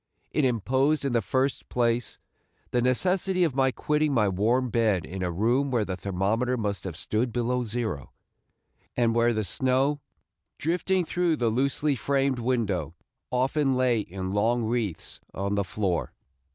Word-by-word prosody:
It 150 Hz, -, +2 dB
imposed 130 Hz, +5 st, +1 dB
in 135 Hz, -, 0 dB
the 115 Hz, -, +3 dB
first 130 Hz, +6 st, -1 dB
place 120 Hz, -1 st, 0 dB, 0.5 s
the 125 Hz, -, +2 dB
necessity 180 Hz, +8 st, +2 dB
of 155 Hz, -7 st, 0 dB
my 135 Hz, -1 st, +3 dB
quitting 150 Hz, +2 st, 0 dB
my 105 Hz, -4 st, +3 dB
warm 115 Hz, +6 st, +1 dB
bed 110 Hz, -7 st, +2 dB
in 95 Hz, +2 st, -6 dB
a 90 Hz, -, 0 dB
room 120 Hz, +10 st, +1 dB
where 120 Hz, -5 st, +1 dB
the 95 Hz, -, -3 dB
thermometer 100 Hz, +7 st, 0 dB
must 100 Hz, -5 st, -3 dB
have 85 Hz, -4 st, -5 dB
stood 115 Hz, +3 st, -1 dB
below 125 Hz, +1 st, 0 dB
zero, 110 Hz, -, -3 dB, 0.9 s
and 120 Hz, -2 st, +3 dB
where 120 Hz, +1 st, +3 dB
the 110 Hz, -2 st, -1 dB
snow, 130 Hz, +6 st, +1 dB, 0.6 s
drifting 180 Hz, +3 st, 0 dB
through 175 Hz, -1 st, +1 dB
the 120 Hz, -5 st, +1 dB
loosely 140 Hz, +4 st, +1 dB
framed 135 Hz, +1 st, 0 dB
window, 105 Hz, -, -1 dB, 0.3 s
often 135 Hz, +2 st, +1 dB
lay 125 Hz, -3 st, +2 dB
in 95 Hz, -2 st, -5 dB
long 115 Hz, +4 st, +1 dB
wreaths 110 Hz, -6 st, -3 dB, 0.2 s
on 100 Hz, +1 st, -1 dB
the 100 Hz, 0 st, +1 dB
floor.. 95 Hz, -2 st, -2 dB
120 Hz, 155 wpm, -27 LUFS, 105-135 Hz, 0.9 s, the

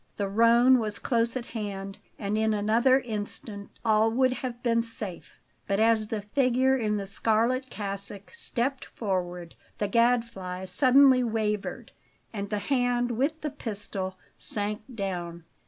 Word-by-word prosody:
The 200 Hz, -, -1 dB
roan 235 Hz, +5 st, +5 dB
was 215 Hz, -2 st, -1 dB
close 235 Hz, -1 st, 0 dB
at 240 Hz, -, -6 dB
hand, 195 Hz, -4 st, -6 dB, 0.2 s
and 205 Hz, 0 st, -2 dB
in 220 Hz, 0 st, +1 dB
another 235 Hz, +6 st, +3 dB
instant 210 Hz, -2 st, -6 dB, 0.2 s
all 220 Hz, 0 st, +4 dB
would 255 Hz, +2 st, +2 dB
have 245 Hz, -2 st, -6 dB
been 230 Hz, -1 st, +2 dB
safe; 220 Hz, -5 st, -4 dB, 0.3 s
but 200 Hz, 0 st, 0 dB
as 220 Hz, -1 st, +3 dB
the 215 Hz, -2 st, -4 dB
figure 260 Hz, +3 st, +2 dB
in 215 Hz, -4 st, 0 dB
the 200 Hz, -, -4 dB
scarlet 230 Hz, +6 st, 0 dB
cassock 200 Hz, -, -4 dB
stepped 270 Hz, -, +3 dB
forward, 180 Hz, -5 st, -4 dB, 0.2 s
the 205 Hz, -, -1 dB
Gadfly 230 Hz, -5 st, 0 dB
suddenly 260 Hz, +6 st, +5 dB
wavered 215 Hz, -3 st, -2 dB, 0.4 s
and 200 Hz, -2 st, -4 dB
the 210 Hz, -, -1 dB
hand 245 Hz, 0 st, 0 dB
with 280 Hz, +7 st, -1 dB
the 300 Hz, -, -3 dB
pistol 205 Hz, -7 st, -5 dB, 0.2 s
sank 210 Hz, 0 st, 0 dB
down. 175 Hz, -4 st, -4 dB
220 Hz, 140 wpm, -27 LUFS, 200-245 Hz, 0.4 s, roan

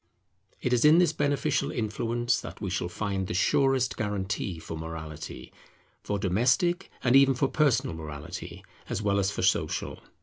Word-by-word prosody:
It 125 Hz, -, 0 dB
is 120 Hz, -, +3 dB
in 150 Hz, +2 st, +7 dB
this 175 Hz, -3 st, +4 dB
beneficial 145 Hz, -2 st, 0 dB
influence 120 Hz, +2 st, -1 dB
that -, -, -9 dB
we 95 Hz, -4 st, -3 dB
shall 90 Hz, -2 st, -2 dB
find 95 Hz, -1 st, -2 dB
the -, -, -3 dB
surest 130 Hz, +6 st, +2 dB
guarantee 95 Hz, -3 st, -2 dB
for 80 Hz, 0 st, -7 dB
morality; 80 Hz, -1 st, -7 dB, 0.5 s
for 105 Hz, -, -2 dB
domestic 125 Hz, -, +1 dB
and 125 Hz, 0 st, +4 dB
even 135 Hz, -1 st, +6 dB
for 135 Hz, +2 st, +1 dB
personal 135 Hz, -, +1 dB
morality, 75 Hz, -2 st, -8 dB, 0.2 s
as 105 Hz, -, -2 dB
well 100 Hz, -1 st, +2 dB
as 95 Hz, -1 st, +1 dB
for -, -, -3 dB
social. -, -, 0 dB
105 Hz, 160 wpm, -28 LUFS, 95-130 Hz, 0.5 s, in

